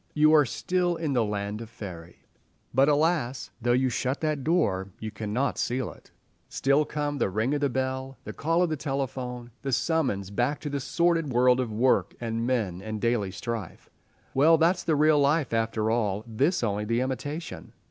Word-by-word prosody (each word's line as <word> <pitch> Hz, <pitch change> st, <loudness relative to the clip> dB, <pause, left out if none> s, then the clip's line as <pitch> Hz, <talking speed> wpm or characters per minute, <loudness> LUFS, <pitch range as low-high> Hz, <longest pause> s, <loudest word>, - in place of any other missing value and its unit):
You 155 Hz, 0 st, +5 dB
are 150 Hz, -4 st, +6 dB
still 180 Hz, +5 st, 0 dB
in 160 Hz, -4 st, -2 dB
the 120 Hz, -3 st, +3 dB
land 105 Hz, 0 st, -3 dB
of 115 Hz, -, -8 dB
faerie. 90 Hz, -7 st, -10 dB, 0.5 s
But, 135 Hz, +3 st, +4 dB
alas, 145 Hz, -5 st, +1 dB
though 120 Hz, +1 st, +1 dB
you 130 Hz, +1 st, +2 dB
shut 130 Hz, +4 st, -1 dB
that 155 Hz, -3 st, -1 dB
door, 100 Hz, -, +1 dB
you 110 Hz, -1 st, -5 dB
cannot 110 Hz, +5 st, -2 dB
seal 125 Hz, 0 st, -1 dB
it. -, -, -18 dB, 0.4 s
Still 140 Hz, +2 st, +2 dB
come 145 Hz, -1 st, -3 dB
the -, -, +1 dB
ring 110 Hz, +8 st, 0 dB
of 145 Hz, -2 st, 0 dB
bell, 130 Hz, +1 st, -3 dB
the -, -, -7 dB
call 165 Hz, +3 st, +1 dB
of 160 Hz, -3 st, 0 dB
telephone, 130 Hz, -4 st, -4 dB
the 135 Hz, -, -3 dB
summons 125 Hz, -, 0 dB
back 125 Hz, +8 st, 0 dB
to 150 Hz, -, -4 dB
the 140 Hz, -, -1 dB
sordid 165 Hz, +2 st, +1 dB
world 125 Hz, +1 st, +4 dB
of 125 Hz, -3 st, -1 dB
work 120 Hz, +5 st, +2 dB
and 115 Hz, 0 st, -2 dB
men 105 Hz, -8 st, -1 dB
and 110 Hz, +1 st, -5 dB
daily 115 Hz, -3 st, +1 dB
strife. 105 Hz, 0 st, -6 dB, 0.4 s
Well, 160 Hz, +5 st, +5 dB
that's 175 Hz, +3 st, +2 dB
the 160 Hz, -, +1 dB
real 150 Hz, 0 st, +4 dB
life 145 Hz, -2 st, +2 dB
after 110 Hz, -1 st, 0 dB
all—this 115 Hz, -, 0 dB
only 105 Hz, -1 st, -1 dB
the 115 Hz, +2 st, 0 dB
imitation. 145 Hz, +6 st, -5 dB
130 Hz, 180 wpm, -27 LUFS, 110-150 Hz, 0.5 s, are